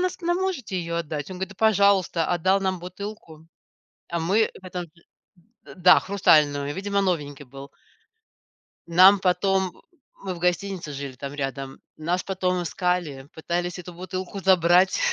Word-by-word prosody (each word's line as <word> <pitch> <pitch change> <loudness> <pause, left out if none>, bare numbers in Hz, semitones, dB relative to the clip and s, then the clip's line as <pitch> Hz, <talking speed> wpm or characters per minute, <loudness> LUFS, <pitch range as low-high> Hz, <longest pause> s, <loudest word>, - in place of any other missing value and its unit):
нас 365 +1 -2
нам 350 +1 0
можете 350 - -3
ее 170 -1 -3
отдать?" 155 -1 -5
Он 185 - -7
говорит: 190 0 -3
"Да 195 - -11
пожалуйста". 200 -6 +3
Отдал 185 +3 +2
нам 190 -2 -1
бутылку, 180 -4 -9 0.6
а 170 0 -2
мы 200 +7 +2
в 185 - -16
этом, 180 -1 -5
э - - -12 0.8
Д - - -12
да, 180 0 +6
хрустальную,- 145 -7 +2
видимо 200 +1 -1
новенький 145 -7 -2
был. 135 +2 -11 1.2
Нам 185 +3 +7
потом, 190 0 +1
м, - - -21 0.4
мы 185 -2 -3
в - - -9
гостинице 180 -2 -2
жили 140 -1 -6
там 140 +2 -7
рядом, 135 -1 -5 0.2
нас 175 +4 -1
потом 185 -2 -1
искали, 170 -6 -2
пытались 175 +2 -3
эту 180 0 -9
бутылку 185 +2 -6
забрать, 185 0 +4
180 Hz, 155 wpm, -24 LUFS, 160-190 Hz, 1.2 s, Нам